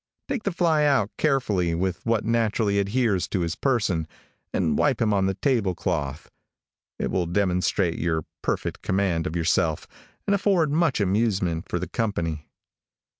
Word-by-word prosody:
Take 270 -4 -2
the 200 - +1
fly 165 -3 +2
out 135 -8 +2
carefully, 105 - +1
with 90 +1 -2
what 115 -2 +1
naturally 110 -3 +1
adheres 100 -1 +1
to 95 - -1
his 85 +1 -1
person, 105 - 0 0.4
and 80 -5 +1
wipe 135 -5 +2
him 110 -3 +2
on 95 -1 +2
the 95 - -1
table 110 -7 +1
cloth. 75 -5 -3 0.7
It - - -2
will 90 -2 0
demonstrate 90 -1 +1
your 80 -2 -1 0.2
perfect - - -2
command 95 -4 0
of 80 - -5
yourself, 80 -1 +1 0.4
and 200 - +3
afford 190 -6 +2
much 160 -4 +2
amusement 95 -4 0
for - - -1
the - - -4
company. 85 -9 -2
100 Hz, 155 wpm, -25 LUFS, 85-120 Hz, 0.7 s, and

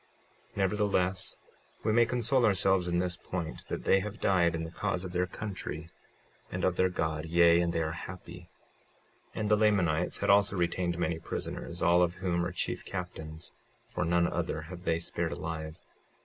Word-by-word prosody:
56:11 - - -16
Nevertheless, 95 -2 +1 0.5
we 110 - +2
may 120 0 +5
console 125 +2 +2
ourselves 95 -3 +3
in 85 0 +1
this 90 -1 +1
point, 85 -3 -5
that - - -4
they 95 - +5
have 105 +3 -5
died 85 -3 +3
in 80 - -2
the 80 - -6
cause 90 +1 -2
of 90 - -5
their 90 0 0
country 90 -5 -6 0.6
and 90 0 -3
of 95 - +2
their 95 +1 +3
God, 80 -3 -2
yea, 85 +1 +5
and 85 -1 +1
they 80 -1 0
are 80 - -2
happy. 85 +1 -9 0.9
56:12 - - -2
And 105 0 0
the 105 - +6
Lamanites 90 -6 +2
had - - +2
also 100 0 +4
retained 85 0 0
many 85 -1 -1
prisoners, 85 +1 -4
all 85 +1 +5
of 90 0 +2
whom 90 -2 0
are 90 - -2
chief - - -2
captains, 85 -3 -6 0.4
for - - -2
none 85 +1 +3
other 75 - -1
have 90 +3 -9
they 80 0 +2
spared 85 0 -2
alive. 80 -1 -5
90 Hz, 185 wpm, -30 LUFS, 85-95 Hz, 0.9 s, the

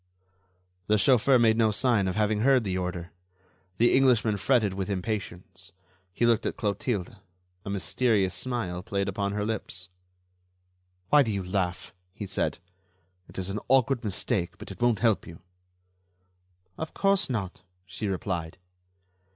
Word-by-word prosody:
The 105 - +4
chauffeur 130 +4 +4
made 115 -2 +4
no 115 -1 +4
sign 105 -2 +2
of 90 - -2
having 105 0 +1
heard 130 +1 +4
the 95 -3 -2
order. 90 -1 -4 0.7
The 120 +1 +4
Englishman 120 -5 +3
fretted 110 -3 +2
with 95 +1 -4
impatience. 95 -3 -5 0.4
He 120 - 0
looked 115 -2 +2
at - - -4
Clotilde; 105 -2 -2 0.5
a 100 - -6
mysterious 100 0 +1
smile 90 -3 -3
played 100 +1 -2
upon 100 +1 -2
her 105 0 -1
lips. 100 -4 -4 1.2
"Why 150 - +7
do 115 -5 0
you 100 -2 -2
laugh?" 90 -1 -2 0.2
he 105 - -5
said. 95 0 -1 0.7
"It - - -13
is 95 +1 -3
an 105 - -3
awkward 130 -1 +3
mistake, 90 -4 -2
but - - -9
it 95 - -11
won't 120 -2 +2
help 115 -4 +2
you." 85 0 -11 1.4
"Of 160 - -5
course 195 -3 +2
not," 100 -7 -3 0.2
she 95 +3 -5
replied. 90 -4 -3
105 Hz, 145 wpm, -27 LUFS, 95-120 Hz, 1.4 s, Why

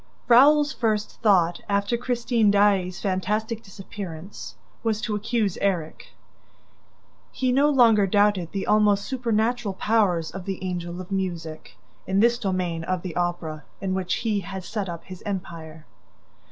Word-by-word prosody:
Raoul's 290 +5 +6
first 215 -3 -2
thought, 185 -6 +3
after 200 +3 +1
Christine 235 -2 +1
Daae's 200 -3 +2
fantastic 210 +4 -1
disappearance, 185 - -9 0.3
was 220 -2 0
to 220 - -2
accuse 210 -2 -1
Erik. 175 -6 -2 1.2
He 255 -1 0
no 280 +4 +4
longer 230 -7 +5
doubted 205 -3 +2
the 195 - -3
almost 210 -1 +3
supernatural 235 -4 -1
powers 190 -7 +1
of 190 -2 -8
the 190 -1 -4
Angel 175 -1 -4
of 185 - -11
Music, 170 -5 -4 0.3
in 190 +1 +1
this 235 +2 +3
domain 185 -5 -2
of 185 0 -2
the 180 -3 -6
Opera 175 -4 -2 0.2
in 190 -1 -2
which 185 -1 -1
he 215 -2 +1
had 190 -1 -6
set 200 0 -4
up 170 -1 -6
his 185 -1 -10
empire. 165 -5 -6
195 Hz, 140 wpm, -24 LUFS, 180-220 Hz, 1.2 s, Raoul's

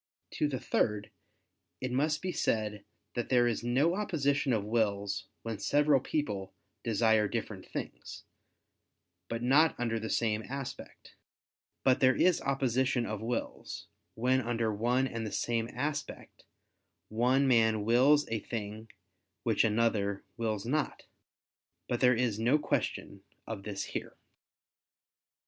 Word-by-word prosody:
To 150 - 0
the 135 -3 -3
third, 105 -4 0 0.7
it 130 - -3
must 150 +5 +1
be 185 - -1
said 105 - -1 0.3
that 120 -2 -3
there 125 -2 +4
is 115 -1 -1
no 135 +8 +2
opposition 145 -9 0
of 110 -4 +1
wills 100 -3 0 0.2
when 115 -2 -4
several 145 -1 +3
people 105 -10 -3 0.3
desire 110 -1 +3
different - - -5
things, - - -7 1.1
but 115 0 -3
not 145 +6 +4
under 115 -2 0
the 110 0 -5
same 110 -2 +1
aspect: 135 -1 -7 0.7
but 130 -1 +4
there 130 0 +5
is 180 -1 +3
opposition 130 -2 +1
of 110 -1 -4
wills, 115 +1 -4 0.3
when 130 +3 +2
under 115 -2 -1
one 120 +5 +1
and 115 -3 -4
the 110 - -4
same 115 -1 -1
aspect, 145 +3 -5 0.6
one 125 +5 +3
man 110 -4 +3
wills 135 +6 +5
a 115 - -1
thing 110 0 -6 0.5
which - - +2
another 105 -3 +1
wills 110 -3 -2
not. 150 +4 -1 0.8
But 120 - -1
there 125 -1 +5
is 115 -3 0
no 120 +6 +4
question 100 -8 -2 0.2
of 110 -3 -5
this 100 -1 -4
here. - - -5
120 Hz, 130 wpm, -31 LUFS, 110-135 Hz, 1.1 s, there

